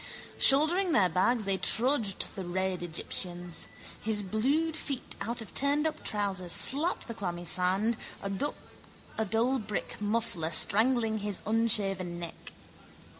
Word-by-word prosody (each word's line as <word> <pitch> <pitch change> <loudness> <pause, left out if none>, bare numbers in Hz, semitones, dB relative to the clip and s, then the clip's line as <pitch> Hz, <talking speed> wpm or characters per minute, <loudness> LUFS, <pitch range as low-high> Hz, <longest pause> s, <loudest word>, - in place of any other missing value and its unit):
Shouldering 325 +6 +5
their 190 -8 +4
bags 215 +6 +1
they 195 -1 0
trudged, 225 -2 +2
the 190 - -5
red 185 +1 -2
Egyptians. 175 +1 -2 0.3
His 210 -1 0
blued 275 - 0
feet 280 -4 -4
out 235 0 -3
of 205 - -14
turnedup 295 +3 +1
trousers 195 -4 -2
slapped 300 - +1
the 230 - -5
clammy 175 -5 -5
sand, 190 +6 +1 0.3
a - - -2 1.0
dull 235 +6 +1
brick 210 -1 -5
muffler 205 -6 -1
strangling 220 +3 +3
his 205 -2 -3
unshaven 200 -5 +1
neck. 170 -1 -8
210 Hz, 125 wpm, -29 LUFS, 185-245 Hz, 1.0 s, Shouldering